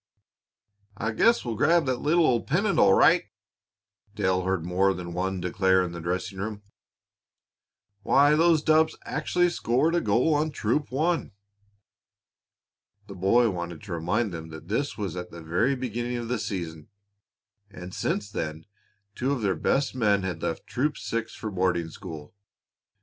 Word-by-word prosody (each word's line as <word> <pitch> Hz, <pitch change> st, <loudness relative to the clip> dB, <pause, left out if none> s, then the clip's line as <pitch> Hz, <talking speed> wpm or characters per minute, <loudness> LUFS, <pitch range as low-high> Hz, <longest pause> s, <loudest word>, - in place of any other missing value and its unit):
"I 110 Hz, +2 st, -1 dB
guess 230 Hz, -, +3 dB
we'll 120 Hz, -, -2 dB
grab 165 Hz, +7 st, +3 dB
that 130 Hz, -2 st, -1 dB
little 165 Hz, +3 st, +3 dB
old 120 Hz, -5 st, +1 dB
pennant, 195 Hz, +7 st, +1 dB
all 95 Hz, -1 st, +6 dB
right," -, -, +5 dB, 0.9 s
Dale 95 Hz, -3 st, +1 dB
heard 95 Hz, -3 st, -1 dB
more 95 Hz, +2 st, +2 dB
than 85 Hz, -1 st, -6 dB
one 95 Hz, +1 st, -2 dB
declare 95 Hz, +1 st, +2 dB
in 90 Hz, -, -4 dB
the 85 Hz, -1 st, -7 dB
dressing 90 Hz, +3 st, -3 dB
room. 105 Hz, 0 st, -5 dB, 1.4 s
"Why, 140 Hz, +7 st, +4 dB
those 165 Hz, -1 st, +4 dB
dubs 155 Hz, 0 st, +3 dB
actually 175 Hz, 0 st, +1 dB
scored 150 Hz, +2 st, +1 dB
a 175 Hz, -, +2 dB
goal 120 Hz, +9 st, +2 dB
on 150 Hz, +1 st, +1 dB
Troop 140 Hz, +1 st, -1 dB
One!" 160 Hz, -, 0 dB, 1.7 s
The 100 Hz, -, -10 dB
boy 105 Hz, +5 st, +3 dB
wanted 85 Hz, -2 st, -6 dB
to 100 Hz, -4 st, -6 dB
remind 90 Hz, +6 st, -1 dB
them 80 Hz, -1 st, -7 dB
that 80 Hz, +2 st, -11 dB
this 115 Hz, 0 st, -1 dB
was 100 Hz, -5 st, -4 dB
at 90 Hz, 0 st, -6 dB
the 85 Hz, -1 st, -10 dB
very 100 Hz, +12 st, +1 dB
beginning 120 Hz, -1 st, -3 dB
of 120 Hz, -1 st, -5 dB
the 125 Hz, -2 st, -1 dB
season, 85 Hz, -7 st, -5 dB, 0.8 s
and 90 Hz, -2 st, -10 dB
since 105 Hz, -1 st, -2 dB
then 80 Hz, -5 st, -4 dB, 0.5 s
two 130 Hz, +5 st, -1 dB
of 130 Hz, -6 st, -2 dB
their 100 Hz, -2 st, +2 dB
best 135 Hz, +7 st, 0 dB
men 105 Hz, -6 st, +2 dB
had 90 Hz, -3 st, -4 dB
left 80 Hz, -, -3 dB
Troop 145 Hz, +4 st, -1 dB
Six 115 Hz, -1 st, -4 dB
for 110 Hz, -, -5 dB
boarding 90 Hz, -3 st, 0 dB
school. 75 Hz, -1 st, -9 dB
105 Hz, 160 wpm, -26 LUFS, 90-130 Hz, 1.7 s, all